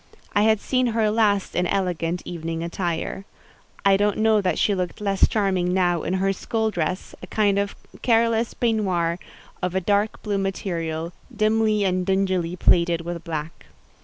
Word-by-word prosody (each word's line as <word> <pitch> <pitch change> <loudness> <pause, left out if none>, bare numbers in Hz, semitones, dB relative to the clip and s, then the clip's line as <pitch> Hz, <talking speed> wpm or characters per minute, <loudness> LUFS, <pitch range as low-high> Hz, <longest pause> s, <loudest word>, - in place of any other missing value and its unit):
I 205 - +3
had 220 0 +4
seen 255 +3 +1
her 220 -2 +1
last 210 -3 +1
in 180 0 +1
elegant 175 -2 -1
evening 165 -1 -4
attire. 170 +2 -3 0.6
I 195 -1 +6
don't 205 0 +1
know 220 -1 +3
that 185 -2 0
she 205 - +2
looked 180 -2 -3
less 200 -2 +3
charming 185 -4 0
now 175 -3 +2
in 180 - -1
her 195 +1 +1
school 220 +3 -1
dress, 180 0 -3
a - - -8
kind 205 -2 +2
of 200 0 -2 0.3
careless 230 -1 +2
peignoir 185 -7 0 0.4
of 180 0 -2
a - - +3
dark 205 +4 0
blue 205 -2 -1
material, 170 -4 -3 0.2
dimly 215 -1 +2
and 185 -1 +1
dingily 185 -2 0
plaided 170 -1 +3
with 170 0 -5
black. 160 -1 -6
195 Hz, 160 wpm, -23 LUFS, 175-210 Hz, 0.6 s, I